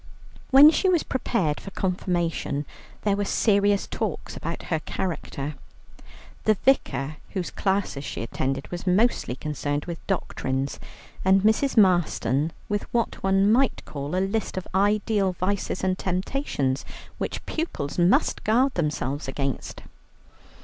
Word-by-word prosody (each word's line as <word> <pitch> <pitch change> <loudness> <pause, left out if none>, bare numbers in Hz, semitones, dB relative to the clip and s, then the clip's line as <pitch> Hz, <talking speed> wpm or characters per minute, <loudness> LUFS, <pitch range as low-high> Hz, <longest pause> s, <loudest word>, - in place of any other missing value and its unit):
When 280 +3 +9
she 375 +3 +2
was 350 -3 +3
prepared 190 - -1
for - - -8
Confirmation, 175 -6 -1 0.4
there 205 -2 +2
were 205 - -1
serious 200 0 +2
talks 215 -7 -4
about 165 +1 -5
her 160 - -1
character. 155 -5 -4 0.9
The 215 - +5
Vicar, 150 - +2 0.2
whose 185 -4 -2
classes 190 -8 -1
she 115 - -4
attended, 135 +3 -3
was 175 +1 -5
mostly 190 - +2
concerned 145 0 -3
with 170 -2 -5
doctrines, 135 +1 -2 0.4
and 190 +1 +4
Mrs. 220 +5 +2
Marston 165 - +3 0.2
with 205 -1 -3
what 235 -1 -1
one 195 +1 +3
might 260 +3 +2
call 145 +3 -4
a 190 +1 +1
list 215 -1 -2
of 185 - -4
ideal 205 0 +2
vices 185 +1 -2
and 185 -1 +2
temptations 180 - -1 0.4
which - - -4
pupils 245 - -3
must 175 +2 +3
guard 250 +5 +3
themselves 150 -4 -2
against. 135 0 -4
185 Hz, 130 wpm, -25 LUFS, 150-210 Hz, 0.9 s, When